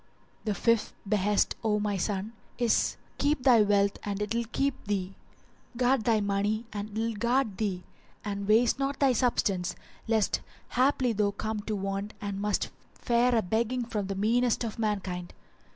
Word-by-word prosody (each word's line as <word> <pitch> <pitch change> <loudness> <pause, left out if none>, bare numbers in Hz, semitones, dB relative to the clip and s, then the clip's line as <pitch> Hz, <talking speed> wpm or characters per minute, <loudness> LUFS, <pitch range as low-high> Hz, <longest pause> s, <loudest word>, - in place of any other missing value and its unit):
The 210 -2 0
FIFTH 230 0 +2
BEHEST, 205 0 +2
O 210 -1 +2
my 205 -1 0
son, 200 +3 -2 0.2
is 240 -2 +2 0.2
Keep 285 -2 +1
thy 245 -4 +6
wealth 200 -1 +2
and 200 -1 -3
it 210 +1 -2
will 235 0 -1
keep 275 0 +1
thee; 195 -2 -1 0.6
guard 250 -1 +2
thy 225 -2 +3
money 205 +2 0
and 205 0 -4
it 210 - -12
will 230 0 0
guard 235 -1 0
thee; 190 -4 -1 0.4
and 200 -1 -3
waste 230 +4 +4
not 275 0 -1
thy 275 -2 +4
substance 205 -7 +1 0.3
lest 220 -2 +1 0.3
haply 255 -1 +2
thou 210 -1 +2
come 215 +2 -3
to 215 - 0
want 195 +1 -3
and 200 -1 -4
must 210 0 0 0.2
fare 240 +1 +2
a 225 - +2
begging 235 +5 0
from 210 -4 -3
the 195 - -3
meanest 235 +5 +2
of 225 -1 -5
mankind. 190 -5 -2
215 Hz, 170 wpm, -29 LUFS, 200-235 Hz, 0.6 s, thy